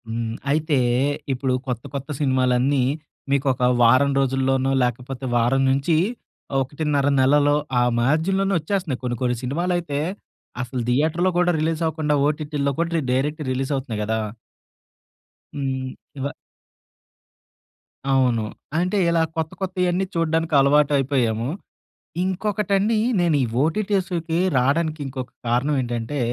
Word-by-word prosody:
హ్మ్. 115 Hz, 0 st, -3 dB, 0.2 s
అయితే 155 Hz, 0 st, +1 dB, 0.6 s
ఇప్పుడు 130 Hz, 0 st, -1 dB
కొత్త 120 Hz, -2 st, -3 dB
కొత్త 140 Hz, +1 st, -5 dB
సినిమాలన్నీ 130 Hz, -1 st, +2 dB, 0.5 s
మీకు 140 Hz, 0 st, +1 dB
ఒక 125 Hz, -, -4 dB, 0.2 s
వారం 130 Hz, +4 st, +5 dB
రోజుల్లోనో, 135 Hz, 0 st, +1 dB
లేకపోతే 125 Hz, +2 st, -3 dB
వారం 120 Hz, +3 st, +2 dB
నుంచి 140 Hz, +5 st, +2 dB, 0.7 s
1.5 145 Hz, +1 st, 0 dB
నెలలో 145 Hz, +2 st, +4 dB, 0.2 s
ఆ -, -, +3 dB, 0.2 s
మార్జిన్‌‌లోనే 185 Hz, +10 st, +1 dB
వచ్చేస్తున్నాయి. 160 Hz, -4 st, -2 dB
కొన్ని 120 Hz, -1 st, -2 dB
కొన్ని 125 Hz, -1 st, +1 dB
సినిమాలయితే 170 Hz, +2 st, -1 dB, 0.6 s
అసలు 125 Hz, 0 st, -3 dB
థియేటర్‌లో 160 Hz, +8 st, +2 dB
కూడా 180 Hz, 0 st, +3 dB
రిలీజ్ 160 Hz, +1 st, -1 dB
అవ్వకుండా, 155 Hz, -2 st, 0 dB
ఓటీటీల్లో 150 Hz, -2 st, -1 dB
కూడా 170 Hz, -1 st, 0 dB
డైరెక్ట్ 150 Hz, +4 st, 0 dB
రిలీజ్ 130 Hz, +2 st, -2 dB
అవుతున్నాయి 125 Hz, -6 st, -3 dB
గదా! 110 Hz, +1 st, -1 dB, 1.4 s
హ్మ్. 130 Hz, -2 st, -2 dB, 0.3 s
ఇవ 140 Hz, +2 st, -2 dB, 1.8 s
అవును. 125 Hz, -4 st, +3 dB, 0.3 s
అంటే 180 Hz, +4 st, +1 dB
ఇలా 170 Hz, -1 st, +2 dB, 0.2 s
కొత్త 160 Hz, -1 st, -1 dB
కొత్తయన్నీ 185 Hz, 0 st, 0 dB
చూడ్డానికి 165 Hz, 0 st, 0 dB
అలవాటైపోయాము. 135 Hz, -5 st, +2 dB, 0.7 s
ఇంకొకటండి 205 Hz, +2 st, 0 dB, 0.2 s
నేను 170 Hz, -3 st, +2 dB
ఈ -, -, +2 dB, 0.2 s
ఓటీటీస్‌కి 175 Hz, -2 st, -1 dB, 0.2 s
రావడానికి 155 Hz, +5 st, +1 dB
ఇంకొక 130 Hz, -2 st, -5 dB, 0.2 s
కారణం 125 Hz, +5 st, +1 dB
ఏంటంటే, 120 Hz, +3 st, -3 dB
140 Hz, 110 wpm, -22 LUFS, 130-165 Hz, 1.8 s, వారం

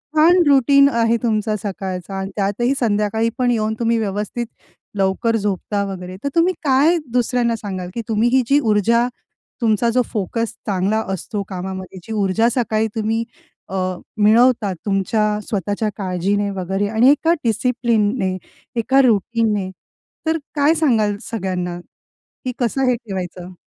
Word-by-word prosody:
छान 340 Hz, +4 st, +6 dB
रुटीन 280 Hz, 0 st, +5 dB
आहे 230 Hz, -2 st, +2 dB
तुमचा 215 Hz, -2 st, 0 dB
सकाळचा 190 Hz, -2 st, -5 dB
आणि 190 Hz, +1 st, -4 dB
त्यातही 210 Hz, +6 st, 0 dB
संध्याकाळी 220 Hz, 0 st, +1 dB
पण 250 Hz, -1 st, +2 dB
येऊन 220 Hz, -2 st, 0 dB
तुम्ही 230 Hz, 0 st, +2 dB
व्यवस्थित 210 Hz, +2 st, -2 dB, 0.5 s
लवकर 195 Hz, +4 st, +1 dB
झोपता 205 Hz, 0 st, -1 dB
वगैरे. 180 Hz, -1 st, -7 dB
तर 280 Hz, -, 0 dB
तुम्ही 340 Hz, +2 st, +3 dB
काय 290 Hz, +5 st, +4 dB
दुसऱ्यांना 245 Hz, -1 st, +1 dB
सांगाल, 190 Hz, -4 st, -5 dB
की 235 Hz, -, -3 dB
तुम्ही 225 Hz, +1 st, +2 dB
ही 260 Hz, +1 st, +4 dB
जी 280 Hz, +3 st, +4 dB
ऊर्जा, 230 Hz, 0 st, +2 dB, 0.5 s
तुमचा 230 Hz, 0 st, +2 dB
जो 250 Hz, +2 st, +2 dB
फोकस 230 Hz, +2 st, -2 dB
चांगला 200 Hz, +2 st, +1 dB
असतो 200 Hz, +2 st, -4 dB
कामामध्ये, 190 Hz, 0 st, -6 dB
जी 225 Hz, -, -4 dB
ऊर्जा 210 Hz, +2 st, +2 dB
सकाळी 220 Hz, -3 st, +1 dB
तुम्ही 225 Hz, +1 st, 0 dB, 0.5 s
अ, 190 Hz, -, -5 dB, 0.4 s
मिळवता 220 Hz, 0 st, +4 dB
तुमच्या 200 Hz, +2 st, 0 dB, 0.3 s
स्वतःच्या 205 Hz, +2 st, -1 dB
काळजीने 195 Hz, +2 st, -1 dB
वगैरे 195 Hz, +1 st, -2 dB
आणि 225 Hz, +5 st, +4 dB
एका 320 Hz, +3 st, +3 dB
डिसिप्लिनने, 230 Hz, -4 st, +1 dB, 0.4 s
एका 265 Hz, +4 st, +4 dB
रुटीनने 220 Hz, -4 st, +1 dB, 0.6 s
तर 320 Hz, 0 st, +2 dB, 0.2 s
काय 290 Hz, +2 st, +4 dB
सांगाल 225 Hz, -10 st, +2 dB
सगळ्यांना, 180 Hz, -5 st, -3 dB, 0.7 s
की 255 Hz, -, -1 dB
कसं 245 Hz, +2 st, 0 dB
हे 250 Hz, -, +3 dB
ठेवायचं? 185 Hz, -5 st, -6 dB
220 Hz, 135 wpm, -20 LUFS, 195-240 Hz, 0.7 s, छान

